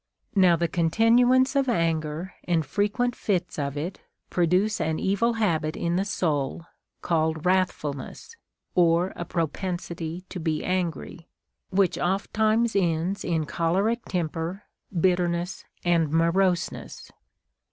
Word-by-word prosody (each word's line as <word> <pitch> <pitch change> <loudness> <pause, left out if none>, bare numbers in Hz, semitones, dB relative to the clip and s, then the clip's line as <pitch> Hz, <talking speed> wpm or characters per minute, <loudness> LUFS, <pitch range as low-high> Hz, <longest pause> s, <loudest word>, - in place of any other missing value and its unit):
3. 195 - +3
Now 180 -2 +6
the 170 +1 0
continuance 235 - +3
of 275 -2 +2
anger 165 -2 -1
and 165 -3 +1
frequent 210 - 0
fits 180 -5 -1
of 140 0 -2
it 165 +6 -4 0.3
produce 185 +5 +2
an 160 0 0
evil 205 +5 +1
habit 165 -8 0
in 170 0 -1
the 190 +2 +1
soul 160 -5 -1 0.4
called 160 -2 0
Avrath 185 0 +3
fulness, 145 - -7 0.4
or 175 +1 +3
a 175 - -5
propensity 170 0 -3
to 185 - -6
be 160 -2 -1
angry, 175 -2 -3 0.4
Λvhich 190 -1 +2
oft 190 +3 -1
times 220 +1 +2
ends 175 +1 0
in 165 -3 0
choleric 195 +10 0
temper, 170 +2 -3 0.3
bitterness, 175 -1 0 0.2
and 170 -3 +3
moroseness. 170 +2 0
175 Hz, 125 wpm, -26 LUFS, 165-195 Hz, 0.4 s, Now